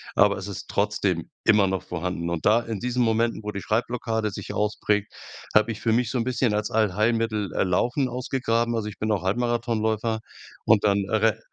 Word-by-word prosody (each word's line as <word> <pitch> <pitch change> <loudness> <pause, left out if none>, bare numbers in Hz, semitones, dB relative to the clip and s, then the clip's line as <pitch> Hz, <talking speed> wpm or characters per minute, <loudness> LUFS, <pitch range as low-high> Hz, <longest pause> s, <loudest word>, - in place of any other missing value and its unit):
aber 100 -1 +4
es 95 - -6
ist 100 - -7
trotzdem 100 -4 0 0.2
immer 105 -2 +5
noch 95 -1 -2
vorhanden. 90 0 -3
Und 85 -2 -3
da, 110 +2 +5
in 115 -3 -5
diesen 125 0 0
Momenten, 115 0 +1
wo 105 - -3
die 100 - -5
Schreibblockade 115 -2 -1
sich - - -6
ausprägt, 105 0 0 0.4
habe 110 +2 +4
ich 110 - -6
für 115 - +1
mich 120 0 +1
so 130 - -1
'n 115 - 0
bisschen 125 -3 +1
als 105 0 -1
Allheilmittel, 110 0 +1
äh, - - +1
Laufen 120 +9 +1
ausgegraben. 120 -2 -1
Also, 110 -2 -2
ich 105 - -11
bin 110 - -1
auch 100 -4 0
Halbmarathonläufer 115 -2 0 0.5
und 110 -2 +4
dann 100 -1 +3
erre 110 0 +2
110 Hz, 195 wpm, -25 LUFS, 100-115 Hz, 0.5 s, immer